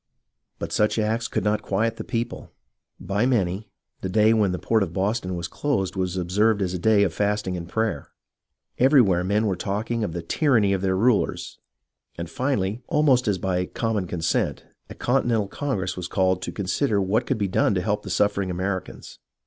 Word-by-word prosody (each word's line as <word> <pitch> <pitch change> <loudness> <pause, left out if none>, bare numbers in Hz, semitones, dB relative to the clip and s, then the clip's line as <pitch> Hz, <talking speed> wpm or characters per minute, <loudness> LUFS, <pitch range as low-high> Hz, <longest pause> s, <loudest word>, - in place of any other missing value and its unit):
But - - -5
such 105 +1 +1
acts 110 +2 0
could - - -2
not 105 0 +1
quiet 110 +3 -1
the - - -5
people. 120 +1 -4 0.5
By 100 +5 0
many, 100 -4 0 0.3
the 95 - -3
day 110 +3 +4
when 105 -4 +2
the 90 - -2
port 110 +3 +1
of 90 -4 -2
Boston 95 0 -1
was 85 -1 -4
closed 100 -3 -1
was 95 -1 -2
observed 100 +4 +2
as 90 -1 -2
a 90 - -3
day 105 +2 +4
of 90 -5 0
fasting 105 -1 -1
and 85 -1 -6
prayer. 110 +1 -2 0.7
Everywhere 120 -10 +5
men 105 +4 +1
were 100 -3 0
talking 110 +5 -2
of 85 - -3
the 85 -1 -4
tyranny 115 -10 +2
of 95 - -1
their 95 -1 +1
rulers, 115 +1 +1 0.6
and 85 - -4
finally, 120 -4 -1
almost 135 -5 +3
as 100 -3 +2
by 90 0 -1
common 110 -5 -2
consent, 85 -1 -1 0.2
a - - -9
Continental 120 -5 +1
Congress 100 -7 -3
was 90 -1 -5
called 95 0 +1
to - - -4
consider 100 +3 0
what 100 +3 0
could 130 - 0
be 100 -2 0
done 100 +2 +2
to 90 - +1
help 105 +1 0
the 95 - -8
suffering 100 +1 +1
Americans. 95 +1 -4
100 Hz, 190 wpm, -24 LUFS, 95-115 Hz, 0.7 s, Everywhere